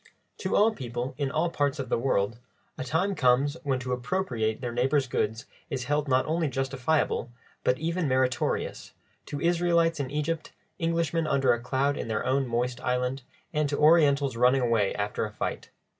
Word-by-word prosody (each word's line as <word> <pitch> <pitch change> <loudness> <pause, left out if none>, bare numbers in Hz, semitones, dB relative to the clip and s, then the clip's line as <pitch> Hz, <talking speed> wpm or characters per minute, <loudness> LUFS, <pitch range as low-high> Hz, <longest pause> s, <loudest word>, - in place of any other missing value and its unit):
To 190 - -1
all 215 +2 +5
people 125 - -4
in 140 -2 0
all 165 +4 0
parts 145 -2 0
of 135 -3 -4
the - - +1
world, 115 -3 0 0.4
a - - -4
time 160 +10 0
comes 140 -1 +3
when 140 -5 0
to 125 0 -5
appropriate 125 - -1
their 125 -2 -3
neighbour's 135 +4 +2
goods 110 -2 -2 0.2
is 130 - -3
held 145 +3 0
not 130 -1 +3
only 160 0 0
justifiable, 135 0 0 0.3
but 125 - +2
even 165 +2 -1
meritorious; 130 -1 0 0.3
to 145 - -4
Israelites 170 -1 +2
in 135 -2 -2
Egypt, 150 +3 -3 0.3
Englishmen 165 -1 0
under 135 -4 +3
a 120 - -2
cloud 135 +4 0
in - - -4
their 110 -1 -2
own 130 +1 +1
moist 120 +1 -1
island, 125 +1 -1 0.3
and 150 -2 +1
to 145 - -1
Orientals 145 -4 +4
running 125 +3 +4
away 115 -5 +1
after 105 0 -2
a 105 - -4
fight. - - -4
135 Hz, 175 wpm, -27 LUFS, 125-155 Hz, 0.4 s, all